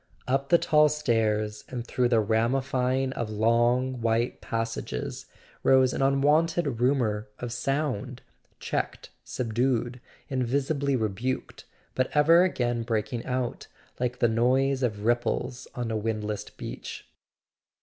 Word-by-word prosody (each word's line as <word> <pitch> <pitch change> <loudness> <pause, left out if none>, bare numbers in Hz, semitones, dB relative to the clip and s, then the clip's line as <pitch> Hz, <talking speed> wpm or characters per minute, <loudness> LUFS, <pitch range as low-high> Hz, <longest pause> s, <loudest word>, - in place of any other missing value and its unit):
Up 135 +2 0
the 170 - +7
tall 150 -2 +4
stairs 110 -7 0
and 120 -2 -5
through 125 0 +1
the 115 -2 +4
ramifying 130 +4 +1
of 120 -4 -3
long 120 +4 +2
white 115 +2 0
passages 115 0 -4 0.3
rose 130 -1 +4
an - - -2
unwonted 145 +1 +2
rumour 115 -5 +1
of 120 -1 -5
sound, 130 -1 -2 0.4
checked, - - -3
subdued, 120 +1 -1 0.3
invisibly 140 +2 0
rebuked, 115 +3 -3 0.3
but 130 0 0
ever 165 +4 +6
again 120 -9 0
breaking 115 0 -2
out, 125 -1 -2 0.3
like 125 0 -1
the 120 - +3
noise 130 +4 +2
of 110 -4 -1
ripples 120 +1 0
on 120 -2 -3
a - - -1
windless 105 -1 -3
beach. - - -8
125 Hz, 120 wpm, -27 LUFS, 115-135 Hz, 0.4 s, the